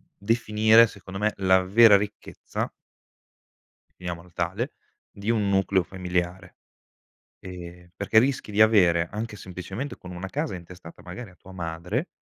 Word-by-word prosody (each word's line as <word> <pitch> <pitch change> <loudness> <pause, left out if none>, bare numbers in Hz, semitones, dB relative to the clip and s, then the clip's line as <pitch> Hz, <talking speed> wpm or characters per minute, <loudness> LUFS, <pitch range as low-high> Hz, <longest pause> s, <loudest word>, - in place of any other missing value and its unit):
definire, 110 +1 +4
secondo 95 -3 -9
me, 105 0 +1
la 95 -1 +4
vera 105 +2 +7
ricchezza 105 +1 -5 1.3
finiamolo 85 -1 -6
tale, 95 - -2 0.4
di 100 +3 -3
un 105 -3 +1
nucleo 95 -1 +2
familiare, 90 0 -4 0.8
ehm, 90 -1 -10
perché 110 - +3
rischi 130 -3 +1
di 105 - 0
avere 90 -6 +5
anche, 105 +1 -5
semplicemente, 95 +8 -6
con 90 - -11
1 90 +2 -6
casa 150 -1 -3
intestata, 90 -1 -11
magari, 95 +4 -8
a - - -19
tua 95 - -15
madre, 90 - -3
95 Hz, 135 wpm, -25 LUFS, 90-110 Hz, 1.3 s, vera